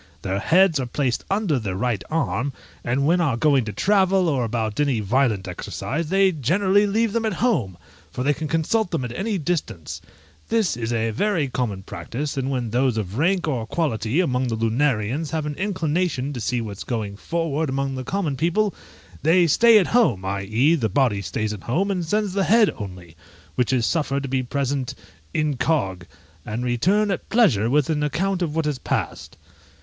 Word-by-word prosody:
Their 95 +1 -1
heads 175 - +4
are 130 - -2
placed 125 -1 -1
under 195 -9 +1
their 100 -5 -3
right 110 -3 -1
arm, 145 -4 -1 0.3
and 130 +4 0
when 175 +4 +3
are 140 -8 +1
going 135 -2 +3
to 105 - -4
travel, 190 - +2
or 135 -6 +1
about 110 -1 -2
any 140 -6 +2
violent 110 -2 +1
exercise, 145 - -4
they 195 +1 +4
generally 190 - +2
leave 220 +1 +1
them 230 -1 0
at 215 -4 -1
home, 125 - 0 0.3
for 125 +11 -4
they 145 +2 +3
can 155 +2 -5
consult 165 +7 +1
them 160 -7 -2
at 120 0 -6
any 205 +1 -1
distance; 150 - -3 0.5
this 220 - +1
is 115 0 -3
a 115 -1 0
very 175 - 0
common 110 -7 -3
practice; 120 - -5
and 135 -1 -2
when 125 -5 -2
those 125 0 +1
of 105 +2 -3
rank 175 +2 +2
or 120 -7 -2
quality 120 - -1
among 130 -7 +1
the 115 - -1
Lunarians 120 +4 0
have 155 0 -2
an 150 - -3
inclination 170 -6 -1
to 125 - -5
see 120 +1 -1
what's 105 -3 -6
going 110 -5 -3
forward 160 +4 -2
among 135 0 -1
the 130 0 -4
common 165 -2 -2
people, 175 +8 +1 0.5
they 175 +3 +4
stay 230 +8 +6
at 195 - +4
home, 145 - +2
i.e., 105 - +1
the 120 -10 0
body 105 -2 +1
stays 110 +1 -2
at 105 - -8
home, 185 - 0
and 180 -3 -2
sends 205 +3 0
the 195 -1 +1
head 225 -1 +4
only, 90 -5 -9 0.4
which 125 -1 0
is 125 -3 +2
suffered 140 -4 0
to - - -3
be 130 0 +1
present 135 0 -2 0.4
incog., 130 - 0 0.4
and 115 +6 -4
return 190 - +2
at 190 - -4
pleasure 155 - +3
with 145 +1 +2
an 150 -1 0
account 185 +6 -1
of 160 -3 -1
what 160 -1 0
has 145 -4 -1
passed. - - -3
140 Hz, 190 wpm, -23 LUFS, 115-175 Hz, 0.5 s, stay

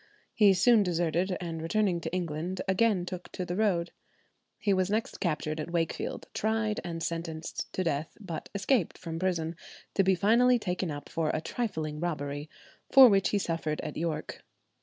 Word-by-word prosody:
He 205 -4 +5
soon 225 +4 +5
deserted, 175 0 0
and 165 -2 -4
returning 180 0 +1
to 165 - -4
England, 175 +1 -3
again 190 -1 +2
took 180 -1 -7
to 180 - -3
the 175 - -3
road. 185 -5 +1 0.7
He 205 -2 +1
was 185 0 +1
next 220 +2 -1
captured 155 -3 -1
at 155 - -4
Wakefield, 170 -1 -2
tried, 220 0 0
and 165 -1 -4
sentenced 165 -1 -4
to 185 - 0
death; 160 -2 -2
but 180 -6 -6
escaped 200 - +1
from 165 -1 -5
prison, 170 -3 -1 0.4
to 195 - +3
be 190 0 +4
finally 235 +6 +4
taken 180 -4 -2
up 145 -1 -6
for 160 -2 -1
a - - 0
trifling 160 -7 -3
robbery, 145 -3 -3 0.4
for 265 -2 +10
which 195 -3 +3
he 205 - +1
suffered 165 -5 -2
at 155 -2 -5
York. 165 -1 -3
175 Hz, 170 wpm, -29 LUFS, 165-200 Hz, 0.7 s, for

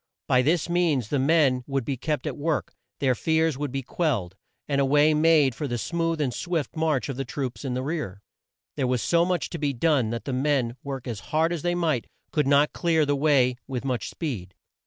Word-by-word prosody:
By 125 - +4
this 160 +6 +1
means 165 - +1
the 145 - +1
men 135 -3 +3
would 135 -3 -1
be 140 - -1
kept 150 +4 -2
at - - -3
work, 155 +1 -2 0.3
their 130 -2 +3
fears 160 +3 +1
would 145 0 -3
be 135 0 -3
quelled, 120 - -1 0.3
and 140 -1 +1
a - - +3
way 150 +3 +4
made 155 -3 +4
for 145 +5 -4
the 120 -2 -2
smooth 165 +5 -1
and 135 -5 0
swift 170 -1 -3
march 155 -4 0
of 135 -3 -5
the 135 - -1
troops 130 0 -5
in 130 -3 -2
the 130 - -2
rear. 140 - -4 0.5
There 135 -3 +1
was 125 -2 0
so 170 0 +3
much 180 -3 -1
to 170 - -5
be 145 -2 0
done 135 -3 +2
that 115 -1 -4
the 135 - -3
men, 130 -3 +1
work 135 -2 -6
as 115 -5 -4
hard 160 +2 +2
as 165 - -3
they 175 +2 0
might, 160 -8 0 0.2
could 150 -3 +1
not 145 +1 +4
clear 160 -3 +2
the 145 0 +1
way 135 -4 +3
with 130 -1 -4
much 125 -5 -2
speed. 100 - -5
140 Hz, 220 wpm, -25 LUFS, 125-160 Hz, 0.5 s, By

